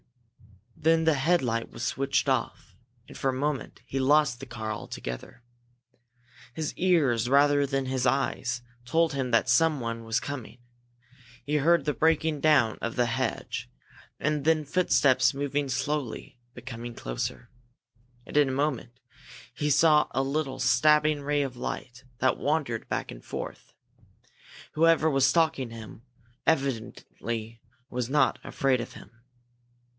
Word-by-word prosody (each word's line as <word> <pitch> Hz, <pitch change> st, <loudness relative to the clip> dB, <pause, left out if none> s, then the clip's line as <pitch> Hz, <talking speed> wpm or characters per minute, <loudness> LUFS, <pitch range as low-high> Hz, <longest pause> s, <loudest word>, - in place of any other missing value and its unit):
Then 160 Hz, +1 st, +2 dB
the 160 Hz, -1 st, +4 dB
headlight 135 Hz, -6 st, +1 dB
was -, -, -8 dB
switched 135 Hz, +3 st, 0 dB
off, -, -, -2 dB, 0.3 s
and -, -, -13 dB
for 135 Hz, -, -1 dB
a -, -, 0 dB
moment 140 Hz, +1 st, -3 dB
he 135 Hz, -, -3 dB
lost 140 Hz, -2 st, +3 dB
the 135 Hz, -, -9 dB
car 110 Hz, -2 st, -5 dB
altogether. 65 Hz, -, -7 dB, 1.1 s
His 155 Hz, -2 st, -3 dB
ears, 140 Hz, -11 st, +2 dB
rather 145 Hz, +1 st, +4 dB
than 135 Hz, -1 st, -1 dB
his 130 Hz, -1 st, 0 dB
eyes, 125 Hz, -1 st, -1 dB, 0.2 s
told 160 Hz, +6 st, +1 dB
him 135 Hz, -2 st, -2 dB
that 115 Hz, +1 st, +3 dB
someone 120 Hz, -4 st, +1 dB
was 115 Hz, 0 st, 0 dB
coming. 130 Hz, -4 st, -7 dB, 0.9 s
He 150 Hz, +1 st, +1 dB
heard 165 Hz, 0 st, +3 dB
the 150 Hz, -, +1 dB
breaking 160 Hz, -1 st, +1 dB
down 145 Hz, -8 st, +3 dB
of 115 Hz, -, -3 dB
the 125 Hz, -, +2 dB
hedge, 115 Hz, -, -3 dB, 0.5 s
and 150 Hz, -1 st, 0 dB
then 155 Hz, 0 st, +2 dB
footsteps 135 Hz, -6 st, +3 dB
moving 145 Hz, 0 st, -1 dB
slowly, 130 Hz, -2 st, -3 dB, 0.2 s
but -, -, -11 dB
coming 120 Hz, -1 st, -7 dB
closer. -, -, -5 dB, 0.7 s
And -, -, -11 dB
in 145 Hz, -2 st, +4 dB
a -, -, -1 dB
moment 130 Hz, -3 st, -2 dB, 0.5 s
he 150 Hz, -, -2 dB
saw 150 Hz, +1 st, +5 dB
a 135 Hz, -, 0 dB
little 140 Hz, 0 st, -2 dB
stabbing 150 Hz, +4 st, +3 dB
ray 145 Hz, 0 st, 0 dB
of 130 Hz, -2 st, -5 dB
light 120 Hz, +1 st, -6 dB
that 130 Hz, +2 st, +1 dB
wandered 145 Hz, -7 st, -1 dB
back -, -, -3 dB
and -, -, -11 dB
forth. -, -, -7 dB, 1.0 s
Whoever 160 Hz, 0 st, +3 dB
was 135 Hz, -1 st, +4 dB
stalking 140 Hz, -3 st, +1 dB
him 110 Hz, -2 st, -10 dB
was 120 Hz, +5 st, -2 dB
evidently 115 Hz, -3 st, -5 dB, 0.3 s
not 130 Hz, +3 st, +1 dB
afraid 130 Hz, -3 st, 0 dB
of 120 Hz, -, -8 dB
him. -, -, -13 dB
135 Hz, 140 wpm, -27 LUFS, 120-150 Hz, 1.1 s, saw